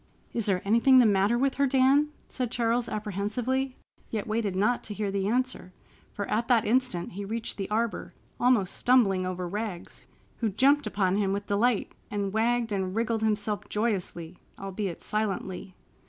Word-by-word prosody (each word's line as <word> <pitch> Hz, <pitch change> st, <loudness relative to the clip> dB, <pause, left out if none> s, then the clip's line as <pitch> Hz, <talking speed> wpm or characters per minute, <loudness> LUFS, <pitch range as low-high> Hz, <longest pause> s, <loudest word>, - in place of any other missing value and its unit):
"Is 230 Hz, -3 st, -1 dB
there 185 Hz, -3 st, +1 dB
anything 235 Hz, +5 st, +5 dB
the 250 Hz, -, +7 dB
matter 205 Hz, +2 st, +3 dB
with 270 Hz, +2 st, 0 dB
her, 280 Hz, 0 st, +3 dB
Dan?" 270 Hz, +3 st, +4 dB, 0.2 s
said 250 Hz, -3 st, -3 dB
Charles 235 Hz, 0 st, 0 dB
apprehensively, 220 Hz, +6 st, -2 dB, 0.3 s
yet 215 Hz, -3 st, -3 dB
waited 215 Hz, -3 st, -1 dB
not 215 Hz, +6 st, +1 dB
to 210 Hz, -, -6 dB
hear 205 Hz, -2 st, -2 dB
the 195 Hz, 0 st, -1 dB
answer, 245 Hz, -5 st, -1 dB, 0.4 s
for 205 Hz, -, -4 dB
at 230 Hz, +2 st, 0 dB
that 235 Hz, -3 st, +3 dB
instant 235 Hz, -7 st, 0 dB
he 200 Hz, +3 st, -6 dB
reached 225 Hz, +3 st, -3 dB
the 195 Hz, -, -4 dB
arbor, 215 Hz, -4 st, -1 dB, 0.3 s
almost 240 Hz, -7 st, +2 dB
stumbling 195 Hz, -8 st, +3 dB
over 180 Hz, -1 st, -3 dB
Rags, 205 Hz, -1 st, -6 dB, 0.3 s
who 225 Hz, -, 0 dB
jumped 275 Hz, +8 st, +3 dB
upon 190 Hz, -1 st, +1 dB
him 195 Hz, -2 st, +1 dB
with 200 Hz, 0 st, -3 dB
delight 210 Hz, +2 st, +1 dB, 0.2 s
and 200 Hz, -2 st, -2 dB
wagged 230 Hz, +1 st, +1 dB
and 190 Hz, -1 st, -2 dB
wriggled 230 Hz, -1 st, 0 dB
himself 210 Hz, -1 st, -1 dB
joyously—albeit 195 Hz, -2 st, -4 dB
silently. 195 Hz, -3 st, -3 dB
215 Hz, 160 wpm, -28 LUFS, 195-240 Hz, 0.4 s, the